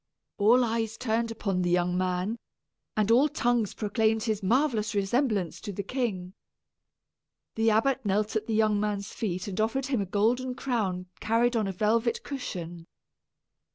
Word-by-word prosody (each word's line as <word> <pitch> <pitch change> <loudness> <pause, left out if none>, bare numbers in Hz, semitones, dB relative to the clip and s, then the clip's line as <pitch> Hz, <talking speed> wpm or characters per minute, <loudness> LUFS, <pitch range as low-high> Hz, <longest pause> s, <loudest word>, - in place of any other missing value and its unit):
All 235 +5 +5
eyes 225 -1 -2
turned 230 0 0
upon 200 -5 -2
the 175 - 0
young 175 0 +2
man, 185 +4 -1 0.6
and 215 +1 +2
all 265 +6 +5
tongues 240 -6 0
proclaimed 220 +1 +1
his 215 -2 -1
marvellous 220 0 +1
resemblance 200 - 0
to 205 - -5
the 200 +1 -4
king. 195 -6 -3 1.2
The 225 0 +2
abbot 255 +5 +2
knelt 210 +1 0
at 220 0 -1
the 225 - 0
young 215 -1 +3
man's 205 -1 -2
feet 185 -4 -3
and 200 +1 -2
offered 230 +5 0
him 260 -5 0
a 195 - -3
golden 245 +6 +1
crown 210 -9 -2
carried 235 +2 +2
on 215 -3 +1
a - - -1
velvet 225 +5 +1
cushion. 175 - -6
220 Hz, 155 wpm, -28 LUFS, 195-235 Hz, 1.2 s, All